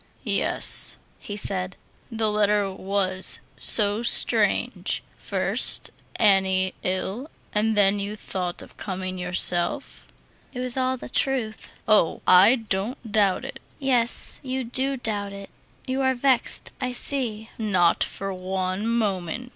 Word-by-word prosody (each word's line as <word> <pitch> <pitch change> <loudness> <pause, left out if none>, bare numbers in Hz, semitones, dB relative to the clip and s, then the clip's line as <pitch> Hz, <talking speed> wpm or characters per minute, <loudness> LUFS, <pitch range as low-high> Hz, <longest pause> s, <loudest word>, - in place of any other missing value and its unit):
"Yes," - - +1 0.2
he 205 - -8
said, 185 -2 -2 0.3
"the 220 -1 -1
letter 210 -1 +1
was 190 -1 0 0.2
so 210 0 +5
strange. 240 - +1
First, - - +1 0.2
Annie 190 -2 +2
ill, 190 +9 -3 0.2
and 215 +1 0
then 200 0 +3
you 200 +1 -4
thought 180 -4 -4
of - - -17
coming 185 -1 -5
yourself." 180 +7 0 0.5
"It 250 - -7
was 250 -1 +3
all 260 0 -1
the - - -10
truth." 245 -5 -3
"Oh, 210 -6 +2
I 190 +7 +6
don't 225 +1 -5
doubt 205 -3 +1
it." - - -9 0.2
"Yes, 250 -4 +1
you 260 0 -4
do 265 +3 -2
doubt 205 -4 -4
it. 200 0 -11 0.3
You 260 +1 -3
are 260 -1 +1
vexed, 255 0 0
I 250 0 -3
see." 235 -4 +5
"Not 185 -6 +1
for 195 0 -6
one 185 +2 -4
moment. 220 0 -2
210 Hz, 130 wpm, -23 LUFS, 190-245 Hz, 0.5 s, I